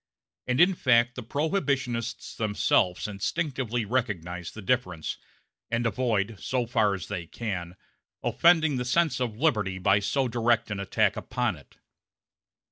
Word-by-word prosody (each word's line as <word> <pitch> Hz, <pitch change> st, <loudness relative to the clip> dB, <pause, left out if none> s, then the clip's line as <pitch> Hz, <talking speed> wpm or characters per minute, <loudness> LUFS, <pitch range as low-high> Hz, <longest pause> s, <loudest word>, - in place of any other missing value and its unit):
And 125 Hz, 0 st, +1 dB
in 180 Hz, +3 st, +6 dB
fact 125 Hz, -6 st, +3 dB
the 125 Hz, -, -6 dB
prohibitionists 130 Hz, -, -2 dB
themselves 105 Hz, -4 st, +1 dB
instinctively 120 Hz, -, -2 dB
recognize 90 Hz, -7 st, -2 dB
the 110 Hz, -, -10 dB
difference, 90 Hz, -9 st, -1 dB, 0.5 s
and 120 Hz, +1 st, 0 dB
avoid, 110 Hz, -2 st, 0 dB
so 125 Hz, -2 st, -1 dB
far 110 Hz, -4 st, +2 dB
as 95 Hz, 0 st, -6 dB
they 85 Hz, -2 st, -5 dB
can, 90 Hz, -5 st, -5 dB, 0.5 s
offending 160 Hz, -5 st, +4 dB
the 125 Hz, -, -1 dB
sense 160 Hz, +5 st, +2 dB
of 115 Hz, -4 st, -2 dB
liberty 105 Hz, -10 st, +1 dB
by 95 Hz, +2 st, +3 dB
so 130 Hz, +6 st, 0 dB
direct 115 Hz, -1 st, +1 dB
an 100 Hz, -, -3 dB
attack 100 Hz, -, +1 dB
upon -, -, -1 dB
it. -, -, -18 dB
115 Hz, 135 wpm, -27 LUFS, 100-130 Hz, 0.5 s, in